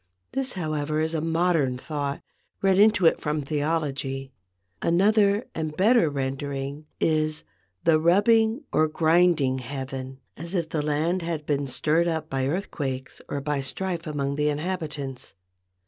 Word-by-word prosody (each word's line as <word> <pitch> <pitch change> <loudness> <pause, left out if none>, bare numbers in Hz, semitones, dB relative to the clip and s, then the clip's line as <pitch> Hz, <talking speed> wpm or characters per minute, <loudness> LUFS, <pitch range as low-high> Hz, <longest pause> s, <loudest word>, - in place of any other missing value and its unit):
This, 270 -1 -2
however, 155 -3 -2
is 160 +1 0
a 160 - 0
modern 165 -5 +1
thought, 145 0 -4 0.4
read 195 -1 +4
into 210 -3 +5
it 165 - +4
from 150 -1 -1
theology. 140 -3 -2 0.5
Another 200 +4 +3
and 155 -1 -4
better 210 -3 +4
rendering 140 +1 -4
is 155 -1 +1 0.4
"the 160 -1 +4
rubbing 220 - +3
or 155 - +3
grinding 160 -4 +3
heaven," 130 0 -6 0.2
as 170 +5 -6
if 170 -3 -1
the 155 - -1
land 155 +5 0
had 165 -3 -3
been 145 -1 0
stirred 155 +6 +1
up 160 -2 -2
by 135 -1 0
earthquakes 140 -6 -3
or 140 - -2
by 145 0 -1
strife 170 +5 -3
among 140 -2 -2
the 150 0 +2
inhabitants. 150 - -4
155 Hz, 140 wpm, -25 LUFS, 140-170 Hz, 0.5 s, into